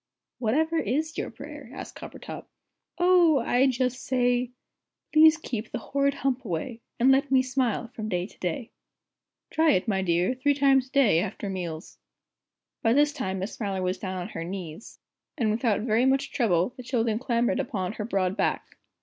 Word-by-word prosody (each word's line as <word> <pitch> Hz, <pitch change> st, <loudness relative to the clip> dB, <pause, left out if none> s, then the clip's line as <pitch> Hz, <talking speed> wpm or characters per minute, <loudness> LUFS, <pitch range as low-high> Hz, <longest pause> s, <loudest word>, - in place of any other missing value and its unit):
"Whatever 315 Hz, +8 st, +1 dB
is 310 Hz, +7 st, -1 dB
your -, -, -3 dB
prayer?" -, -, -10 dB
asked -, -, -8 dB
Coppertop. -, -, -9 dB, 0.5 s
"Oh, 350 Hz, -3 st, +5 dB
I 250 Hz, +2 st, +3 dB
just 255 Hz, 0 st, -1 dB
say 245 Hz, -1 st, +1 dB, 0.6 s
Please 315 Hz, +1 st, +7 dB
keep 235 Hz, -8 st, -5 dB
the -, -, -3 dB
horrid 280 Hz, 0 st, 0 dB
Hump 265 Hz, -2 st, -1 dB
away, 225 Hz, +5 st, -4 dB, 0.2 s
And 255 Hz, +3 st, +5 dB
let 270 Hz, +1 st, +3 dB
me 260 Hz, -1 st, +4 dB
smile 250 Hz, -3 st, -1 dB
from 215 Hz, -3 st, -6 dB
day 180 Hz, -2 st, -1 dB
to -, -, -16 dB
day. 205 Hz, +7 st, -3 dB, 0.8 s
Try 315 Hz, -1 st, +4 dB
it, 185 Hz, -, 0 dB
my 195 Hz, -3 st, +1 dB
dear, 175 Hz, +4 st, +1 dB
three 280 Hz, +3 st, +1 dB
times 270 Hz, -2 st, +3 dB
a -, -, -27 dB
day, 255 Hz, -13 st, +4 dB
after 195 Hz, +1 st, -3 dB
meals." 170 Hz, -4 st, -6 dB, 0.8 s
By 225 Hz, -, +3 dB
this 295 Hz, +2 st, +3 dB
time 190 Hz, -6 st, -3 dB
Miss 190 Hz, +3 st, -4 dB
Smiler 195 Hz, -4 st, -3 dB
was 185 Hz, +1 st, -1 dB
down 185 Hz, -1 st, -4 dB
on 180 Hz, +2 st, -5 dB
her 165 Hz, -, -5 dB
knees, 180 Hz, +1 st, -7 dB, 0.4 s
and 220 Hz, -3 st, +1 dB
without 220 Hz, -1 st, +1 dB
very 230 Hz, +3 st, +2 dB
much 270 Hz, +1 st, +1 dB
trouble 190 Hz, -3 st, +1 dB
the -, -, -7 dB
children 230 Hz, -3 st, 0 dB
clambered 240 Hz, +1 st, 0 dB
upon 205 Hz, -8 st, -2 dB
her 215 Hz, -, -5 dB
broad 195 Hz, -3 st, 0 dB
back. -, -, -2 dB
235 Hz, 175 wpm, -26 LUFS, 195-270 Hz, 0.8 s, Please